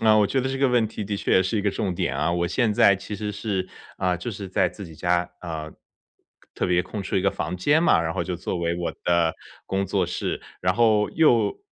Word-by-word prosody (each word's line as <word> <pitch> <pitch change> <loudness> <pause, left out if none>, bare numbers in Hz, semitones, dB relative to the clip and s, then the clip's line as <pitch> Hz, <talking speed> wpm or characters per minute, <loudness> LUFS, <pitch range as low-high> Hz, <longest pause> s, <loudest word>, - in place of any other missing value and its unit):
那 110 -1 +5
我 105 -1 +4
觉 135 - 0
得 130 - -1
这 135 - -2
个 135 - +3
问 120 -3 +3
题 110 - -6
的 100 0 -3
确 - - -1
也 95 - +5
是 95 +4 -1
一 - - -1
个 100 - +2
重 95 -3 -2
点 - - -1
啊， - - +1
我 85 0 0
现 115 +2 +1
在 100 -1 +5
其 100 +2 -6
实 105 +1 -4
是， 100 -3 -3 0.3
啊， 90 -1 0
就 90 +8 -5
是 100 -3 -7
在 90 0 +2
自 100 +3 -9
己 80 - -12
家， 90 +2 0
呃， 80 -3 -6 0.8
特 - - -1
别 90 0 +2
空 100 +2 -6
出 95 - -2
一 95 - +3
个 100 - +2
房 85 +3 -3
间 145 - +3
嘛， 125 - +4
然 80 0 -2
后 - - -1
就 90 -2 -3
作 90 - -3
为 85 0 -1
我 85 - -2
的 85 -2 +2 0.3
工 95 0 0
作 95 -1 0
室， 90 - -3 0.2
然 90 0 +2
后 110 -2 +3
又 120 -10 +3
95 Hz, 270 characters per minute, -24 LUFS, 90-105 Hz, 0.8 s, 那